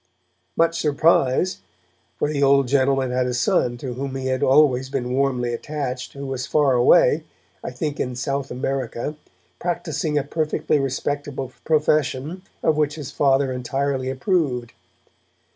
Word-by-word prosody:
Much 165 0 +2
surprise 150 - +2 0.6
for - - 0
the 145 -1 -2
old 140 -1 +4
gentleman 135 -1 +2
had 125 0 +1
a 125 - -2
son 120 0 +1
to 125 0 -5
whom 135 +2 -5
he 135 -1 -4
had 130 -1 -1
always 130 -2 +4
been 125 -2 -2
warmly 125 -3 0
attached, 130 -1 -4
who 140 0 -7
was 130 -1 -4
far 145 -3 +3
away, 120 0 +5 0.4
I - - -3
think 145 +4 -4
in 125 -1 -2
South 135 +2 -2
America, 130 +2 -3 0.4
practising 160 -3 -2
a 145 - +1
perfectly 155 0 0
respectable 135 0 -3
profession 155 +1 +1 0.2
of 155 - +2
which 150 -1 +1
his 145 -4 -7
father 135 -1 +2
entirely 130 +1 -2
approved. 135 - -1
135 Hz, 145 wpm, -22 LUFS, 130-150 Hz, 0.6 s, away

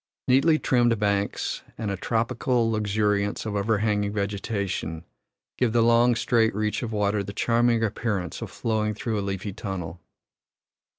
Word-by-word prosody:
Neatly 140 +5 +4
trimmed 120 -5 +2
banks 100 -1 -1 0.2
and 110 -3 -2
a - - -1
tropical 115 +2 0
luxuriance 105 -1 0
of 105 -2 -3
overhanging 105 0 +1
vegetation 100 -5 -3 0.6
give 120 -3 +2
the 115 -1 +4
long 120 +1 +4
straight 110 -2 +2
reach 105 0 -1
of 115 -3 -4
water 105 -1 +1
the 100 +1 -7
charming 115 +1 +2
appearance 105 -5 -2
of - - -5
flowing 110 -2 -1
through 110 0 -2
a - - -1
leafy 100 0 -4
tunnel. 90 -5 -6
105 Hz, 140 wpm, -25 LUFS, 100-115 Hz, 0.6 s, Neatly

